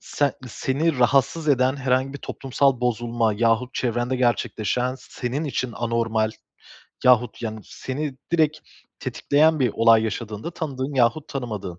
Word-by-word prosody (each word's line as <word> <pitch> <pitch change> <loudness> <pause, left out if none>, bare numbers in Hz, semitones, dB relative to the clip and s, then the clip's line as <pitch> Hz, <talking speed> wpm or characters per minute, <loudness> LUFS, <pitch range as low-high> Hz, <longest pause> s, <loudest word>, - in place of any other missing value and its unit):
sen 145 -2 0 0.2
seni 140 +5 -1
rahatsız 135 +5 +2
eden 130 -1 +3
herhangi 130 0 0
bir 140 - -7
toplumsal 135 -1 0
bozulma 120 -2 0
yahut 115 +3 +1
çevrende 120 +1 -1
gerçekleşen 125 0 0
senin 130 +4 -4
için 130 -4 -2
anormal 115 -2 0 0.7
yahut, 125 -2 +3
yani, 110 -1 -4
seni 140 +2 -5 0.2
direkt 155 -2 +2 0.4
tetikleyen 155 +2 +2
bir 125 -3 +3
olay 115 -1 +5
yaşadığında, 110 +4 -4
tanıdığın 140 -5 -4
yahut 130 +4 +2
tanımadığın, 105 - -5
125 Hz, 125 wpm, -23 LUFS, 115-140 Hz, 0.7 s, olay